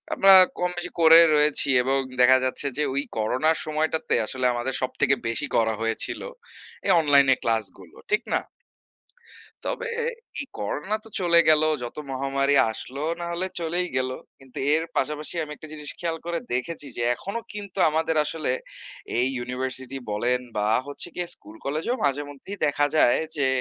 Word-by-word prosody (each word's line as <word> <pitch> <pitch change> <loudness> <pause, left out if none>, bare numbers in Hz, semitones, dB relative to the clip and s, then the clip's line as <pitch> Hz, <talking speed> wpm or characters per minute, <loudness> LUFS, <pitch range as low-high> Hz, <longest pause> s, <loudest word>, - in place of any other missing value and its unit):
আমরা 195 0 +7 0.3
কম 180 0 +1
বেশি 175 0 -3
করে 165 0 +9 0.2
রয়েছি 150 -1 +4
এবং 135 +2 +1 0.2
দেখা 130 +1 +7
যাচ্ছে 135 +2 0
যে, 150 - +1
ঐ - - -5 0.2
করোনার 130 +9 +1
সময়টাতে 155 +1 0
আসলে 130 +3 -2
আমাদের 120 +2 -2
সব 130 - -1
থেকে 135 -1 +4
বেশি 115 - +1
করা 110 -1 +2
হয়েছিল, 115 0 -1 0.6
এই - - +3
অনলাইনে 140 -3 +5
ক্লাসগুলো। 105 -6 -2 0.2
ঠিক 425 - +2
না? - - +2 1.3
তবে, - - -3 0.5
এই 275 - -5
করোনা 150 - -3
তো - - -11
চলে 170 -1 +4
গেলো, 155 0 +5 0.2
যত 120 - -6
মহামারী 140 +1 0 0.2
আসলো 130 +4 -5 0.2
না - - -3
হলে 180 +2 -2
চলেই 175 +2 -1
গেলো। 130 0 -1 0.2
কিন্তু 130 -1 -11 0.2
এর 160 - +1
পাশাপাশি 150 +4 -1
আমি 150 - -9
একটা 155 - -11
জিনিস 150 -2 -4
খেয়াল 165 -1 -2
করে 170 -1 -1
দেখেছি 145 +4 -3
যে, 120 - -2
এখনও 200 - -5
কিন্তু 200 -2 -8
আমাদের 160 +1 0
আসলে 155 -3 -2 0.7
এই 125 - +3
ইউনিভার্সিটি 130 +1 -4
বলেন 120 +4 0 0.2
বা 105 0 0 0.2
হচ্ছে 145 +4 -4
গিয়ে 175 -1 -3
স্কুল-কলেজেও 150 - -4
মাঝেমধ্যেই 145 +7 -3
দেখা 145 0 +2
যায় 120 -5 +5 0.2
যে, 140 -2 +1
145 Hz, 160 wpm, -24 LUFS, 130-160 Hz, 1.3 s, করে